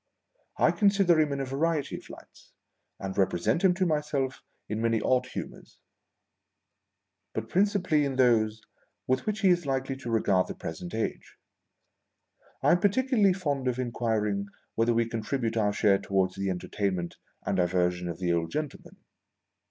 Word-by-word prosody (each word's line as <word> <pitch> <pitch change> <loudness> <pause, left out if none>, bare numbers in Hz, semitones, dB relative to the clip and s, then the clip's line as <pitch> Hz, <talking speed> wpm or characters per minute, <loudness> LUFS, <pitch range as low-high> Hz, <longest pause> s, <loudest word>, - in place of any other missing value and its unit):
I - - +4
consider 195 -5 +3
him 150 -2 +2
in 140 - -2
a - - -2
variety 145 +3 -1
of - - -10
lights, - - -15 0.5
and 95 -1 -5
represent 95 - +1
him 185 -2 +5
to 185 0 +1
myself 150 -4 -1 0.3
in 110 +1 -3
many 115 -1 +2
odd 125 +3 +1
humours, - - -8 1.6
but 110 0 -3
principally 185 -6 +2
in 140 -2 -1
those 110 -4 +3 0.4
with 130 +6 0
which 215 0 -1
he 195 - +5
is 175 -4 +2
likely 135 0 -1
to 125 -3 -7
regard 100 -5 +2
the - - -6
present 85 +5 -6
age. 110 - -4 1.3
I - - +5
aui 175 - +2
particularly 215 -1 +3
fond 145 -8 -2
of 125 -1 0
inquiring 110 -5 -1 0.3
whether 115 +1 +2
we 115 0 +2
contribute 115 +1 -2
our 105 -2 +2
share 100 -1 +3
towards 95 -1 0
the 100 0 -2
entertain 95 +2 -2
ment 85 -1 -5 0.3
and 95 - 0
diversion 90 0 +1
of 85 - -5
the 90 -1 0
old 85 -1 0
gentleman. 150 -1 -5
120 Hz, 160 wpm, -28 LUFS, 100-155 Hz, 1.6 s, him